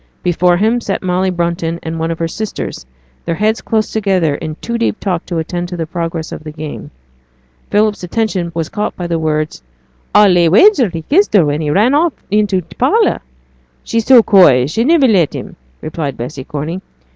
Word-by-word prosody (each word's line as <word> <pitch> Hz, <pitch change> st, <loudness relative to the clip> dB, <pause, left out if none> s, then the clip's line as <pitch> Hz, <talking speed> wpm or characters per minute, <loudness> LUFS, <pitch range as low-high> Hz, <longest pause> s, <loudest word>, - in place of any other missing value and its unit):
Before 175 Hz, 0 st, +2 dB
him 225 Hz, +5 st, +1 dB
sat 195 Hz, -4 st, -3 dB
Molly 185 Hz, +1 st, 0 dB
Brunton 170 Hz, -1 st, -2 dB
and 160 Hz, 0 st, -4 dB
one 165 Hz, +1 st, -1 dB
of 165 Hz, -, -3 dB
her 165 Hz, -, -1 dB
sisters, 205 Hz, -, -6 dB, 0.4 s
their 165 Hz, -, -2 dB
heads 215 Hz, +4 st, 0 dB
close 220 Hz, -1 st, -1 dB
together 190 Hz, -8 st, +1 dB
in 155 Hz, +1 st, -5 dB
too 235 Hz, +7 st, -4 dB
deep 230 Hz, -1 st, -1 dB
talk 180 Hz, -4 st, -3 dB
to 175 Hz, -, -3 dB
attend 175 Hz, +2 st, -3 dB
to 180 Hz, -, -6 dB
the 165 Hz, -, -2 dB
progress 165 Hz, -1 st, -4 dB
of -, -, -7 dB
the 155 Hz, -, -7 dB
game. 150 Hz, -1 st, -8 dB, 0.8 s
Philip's 210 Hz, 0 st, +1 dB
attention 185 Hz, -2 st, -2 dB
was 165 Hz, -2 st, -2 dB
caught 210 Hz, 0 st, -3 dB
by 180 Hz, -, -5 dB
the 170 Hz, -1 st, -1 dB
words 155 Hz, -, -2 dB, 0.5 s
'I'll 210 Hz, -2 st, +7 dB
lay 175 Hz, -1 st, +4 dB
any -, -, +4 dB
wager 260 Hz, -, +5 dB
he 165 Hz, -2 st, -6 dB
kissed 355 Hz, -, +2 dB
her 180 Hz, -6 st, +5 dB
when 145 Hz, +1 st, -1 dB
he 150 Hz, -, -2 dB
ran 215 Hz, -, +3 dB
off 315 Hz, +1 st, +2 dB, 0.2 s
into 205 Hz, -3 st, +1 dB
t' -, -, -17 dB
parlour.' -, -, +2 dB, 0.6 s
'She's 230 Hz, -1 st, -2 dB
so 250 Hz, -4 st, +7 dB
coy 150 Hz, -, +5 dB
she'd 225 Hz, -, -1 dB
niver 315 Hz, -4 st, +4 dB
let 185 Hz, -, +2 dB
him,' -, -, -7 dB, 0.3 s
replied 155 Hz, -3 st, -4 dB
Bessy 130 Hz, +3 st, -6 dB
Corney. 155 Hz, +5 st, -5 dB
175 Hz, 200 wpm, -15 LUFS, 160-215 Hz, 0.8 s, I'll